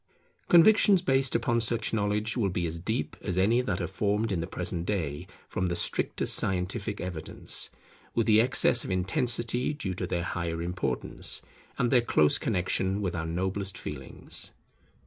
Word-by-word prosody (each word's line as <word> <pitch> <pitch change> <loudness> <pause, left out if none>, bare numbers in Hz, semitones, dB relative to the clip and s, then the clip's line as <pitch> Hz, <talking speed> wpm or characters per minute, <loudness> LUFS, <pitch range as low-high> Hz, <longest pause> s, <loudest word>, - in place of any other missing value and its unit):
Convictions 190 +1 +6
based 135 -4 +1
upon 115 0 +1
such 115 0 +1
knowledge 105 +1 0
will 110 -6 +1
be 90 -1 -2
as 85 0 -4
deep 110 +8 -3
as 90 -3 -3
any 110 +6 +3
that 100 -8 -2
are - - -1
formed 105 +4 -1
in 90 -4 -1
the 85 - -4
present 90 -1 -2
day 85 -4 -2 0.2
from 95 - -2
the 85 - -1
strictest 85 - 0
scientific 95 +3 0
evidence, 90 -3 -4 0.5
with 115 - +2
the 110 -1 +5
excess 120 0 +4
of - - -6
intensity 120 +7 0
due 135 -11 -3
to 90 0 -4
their 85 0 -2
higher 85 -1 -3
importance 85 -7 -2 0.3
and 120 -1 +1
their 125 - +5
close 75 -10 +3
connexion 95 +2 0
with 95 -4 -2
our 80 -1 -3
noblest 95 +2 -2
feelings. - - -6
95 Hz, 165 wpm, -28 LUFS, 90-115 Hz, 0.5 s, Convictions